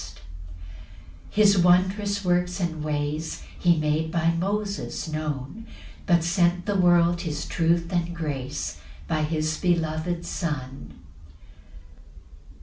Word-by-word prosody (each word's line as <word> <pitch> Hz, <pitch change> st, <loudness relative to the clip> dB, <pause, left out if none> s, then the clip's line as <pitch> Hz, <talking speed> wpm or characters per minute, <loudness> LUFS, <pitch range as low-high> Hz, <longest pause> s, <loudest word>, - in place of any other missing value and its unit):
6 70 Hz, -, -16 dB, 1.1 s
His 205 Hz, -2 st, +4 dB
wondrous 190 Hz, +3 st, +2 dB
works 180 Hz, +1 st, +1 dB
and 160 Hz, -4 st, -2 dB
ways 150 Hz, +1 st, -3 dB, 0.2 s
He 170 Hz, -2 st, +4 dB
made 155 Hz, +1 st, 0 dB
by 165 Hz, 0 st, +2 dB
Moses 200 Hz, +3 st, -2 dB
known; 155 Hz, -, -4 dB, 0.4 s
But 170 Hz, -3 st, +4 dB
sent 175 Hz, 0 st, +2 dB
the 205 Hz, -, -1 dB
world 175 Hz, -2 st, +4 dB
his 150 Hz, -4 st, -3 dB
truth 170 Hz, +1 st, 0 dB
and 175 Hz, -1 st, -1 dB
grace 140 Hz, -5 st, -4 dB, 0.3 s
By 155 Hz, -, 0 dB
his 155 Hz, 0 st, -1 dB
beloved 170 Hz, -1 st, 0 dB
Son. 135 Hz, -6 st, -4 dB
170 Hz, 110 wpm, -25 LUFS, 155-180 Hz, 1.1 s, His